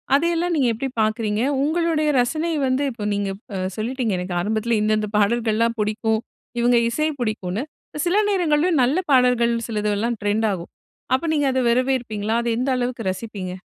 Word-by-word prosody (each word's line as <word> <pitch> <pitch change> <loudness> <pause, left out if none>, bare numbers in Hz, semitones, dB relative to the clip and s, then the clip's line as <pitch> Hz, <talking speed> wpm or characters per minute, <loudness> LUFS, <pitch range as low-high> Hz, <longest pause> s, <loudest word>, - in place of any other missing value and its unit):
அதையெல்லாம் 340 +3 +1
நீங்க 275 -5 +2
எப்டி 245 +5 -3
பாக்குறீங்க? 215 0 0 0.2
உங்களுடைய 315 0 +1
ரசனை 310 +7 0 0.2
வந்து 260 +2 +1
இப்போ 230 -3 -7
நீங்க 200 -1 -1 0.2
ப 195 - -3 0.2
சொல்லிட்டீங்க. 235 0 -1
எனக்கு 180 0 -4
ஆரம்பத்தில 220 +3 0
இந்த 215 0 +1
இந்த 210 -1 -3
பாடல்கள்லாம் 230 +2 +1
புடிக்கும். 220 +1 0 0.4
இவுங்க 240 0 +4
இசை 305 +6 0
பிடிக்குன்னு. 215 -1 -2 0.4
சில 360 +4 +2
நேரங்கள்லயும் 335 -4 +2
நல்ல 265 +7 +2
பாடல்கள் 250 -2 +4
சிலதெல்லாம் 210 +1 -1
ட்ரெண்ட் 210 +2 +1
ஆகும். 175 -2 -7 0.4
அப்போ 265 - -3
நீங்க 290 -2 +2
அதை 260 - +1
வரவேற்பீங்களா? 235 -4 0
அத - - -3
எந்த 255 +3 0
அளவுக்கு 245 -1 -2
ரசிப்பீங்க? 195 -2 -6
235 Hz, 155 wpm, -22 LUFS, 215-270 Hz, 0.4 s, இவுங்க